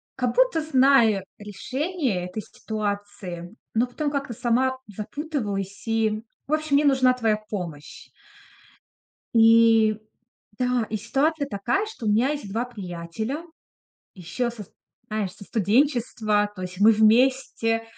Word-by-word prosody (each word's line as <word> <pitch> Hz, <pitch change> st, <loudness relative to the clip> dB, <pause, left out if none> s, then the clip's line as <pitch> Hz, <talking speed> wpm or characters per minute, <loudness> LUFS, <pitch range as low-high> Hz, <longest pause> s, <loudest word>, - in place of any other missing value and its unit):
как-будто -, -, +2 dB
знаю 260 Hz, -9 st, +4 dB
решение 255 Hz, -, -3 dB
этой 200 Hz, +4 st, -5 dB
ситуации, 205 Hz, -4 st, -5 dB, 0.2 s
но 235 Hz, +3 st, +2 dB
потом 290 Hz, +4 st, -2 dB
как-то 275 Hz, -4 st, -3 dB
сама 250 Hz, +3 st, +1 dB
запутываюсь 210 Hz, -, -4 dB
и 220 Hz, -1 st, 0 dB, 0.2 s
в 295 Hz, -, -2 dB
общем 310 Hz, -2 st, +1 dB
мне 295 Hz, -, +4 dB
нужна 260 Hz, -2 st, +4 dB
твоя 225 Hz, -4 st, +1 dB
помощь. 170 Hz, -8 st, -7 dB, 1.3 s
И, 225 Hz, -1 st, +5 dB, 0.6 s
да. 250 Hz, -2 st, +1 dB
И 215 Hz, -, -2 dB
ситуация 285 Hz, +7 st, 0 dB
такая, 255 Hz, -, -1 dB
что 435 Hz, -, -8 dB
у -, -, +2 dB
меня 230 Hz, +6 st, +3 dB
есть 285 Hz, -9 st, -4 dB
2 235 Hz, +4 st, -1 dB
приятеля, 210 Hz, -, -5 dB, 0.7 s
ещё 190 Hz, +7 st, -3 dB
со 225 Hz, -3 st, -9 dB, 0.4 s
знаешь, 210 Hz, -4 st, -2 dB
со 200 Hz, +1 st, -13 dB
студенчества. 220 Hz, -2 st, +1 dB
То 185 Hz, -, -8 dB
есть 180 Hz, +1 st, -7 dB
мы 220 Hz, +2 st, +7 dB
вместе 225 Hz, +1 st, +3 dB
225 Hz, 125 wpm, -24 LUFS, 205-265 Hz, 1.3 s, мы